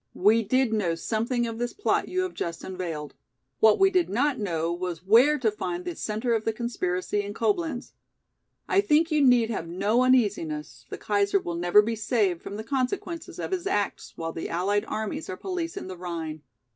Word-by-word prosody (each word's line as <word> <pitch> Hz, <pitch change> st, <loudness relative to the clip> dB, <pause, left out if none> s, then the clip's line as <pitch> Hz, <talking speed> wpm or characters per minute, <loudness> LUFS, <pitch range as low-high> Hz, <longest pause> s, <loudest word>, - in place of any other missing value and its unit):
We 215 Hz, +4 st, +5 dB
did 245 Hz, +2 st, +1 dB
know 185 Hz, -6 st, +1 dB
something 230 Hz, +7 st, -1 dB
of 230 Hz, -1 st, -5 dB
this 240 Hz, 0 st, -2 dB
plot 415 Hz, -, 0 dB
you 370 Hz, -, 0 dB
have 370 Hz, -1 st, -3 dB
just 170 Hz, -1 st, -4 dB
unveiled. 170 Hz, -6 st, -5 dB, 0.5 s
What 220 Hz, -1 st, +6 dB
we 385 Hz, 0 st, +5 dB
did 360 Hz, -2 st, +2 dB
not 265 Hz, +6 st, +1 dB
know 170 Hz, -4 st, -1 dB
was 175 Hz, -1 st, -5 dB
where 245 Hz, +9 st, +6 dB
to 230 Hz, -6 st, +1 dB
find 180 Hz, -3 st, -4 dB
the 175 Hz, -, -4 dB
centre 220 Hz, +6 st, -1 dB
of 220 Hz, -1 st, 0 dB
the 225 Hz, -, +1 dB
conspiracy 205 Hz, -4 st, -2 dB
in 205 Hz, 0 st, -7 dB
Coblenz. 325 Hz, -10 st, -1 dB, 0.8 s
I 395 Hz, -, +4 dB
think 325 Hz, -3 st, +3 dB
you 305 Hz, -2 st, +3 dB
need 245 Hz, -3 st, +4 dB
have 170 Hz, -6 st, -3 dB
no 200 Hz, +8 st, +1 dB
uneasiness, 160 Hz, -, +1 dB
the -, -, -5 dB
Kaiser 200 Hz, -1 st, +1 dB
will 175 Hz, -, -5 dB
never 175 Hz, +5 st, +4 dB
be 225 Hz, +2 st, -1 dB
saved 210 Hz, -6 st, 0 dB
from 200 Hz, -, -7 dB
the 220 Hz, -, -5 dB
consequences 290 Hz, -, -3 dB
of -, -, -4 dB
his 375 Hz, 0 st, -2 dB
acts 205 Hz, -, -2 dB
while 165 Hz, 0 st, -4 dB
the 165 Hz, -, -5 dB
allied 200 Hz, +5 st, 0 dB
armies 215 Hz, -6 st, -4 dB
are 185 Hz, -, -4 dB
policing 355 Hz, -3 st, -4 dB
the 185 Hz, 0 st, -7 dB
Rhine. 165 Hz, -3 st, -5 dB
215 Hz, 195 wpm, -26 LUFS, 180-255 Hz, 0.8 s, What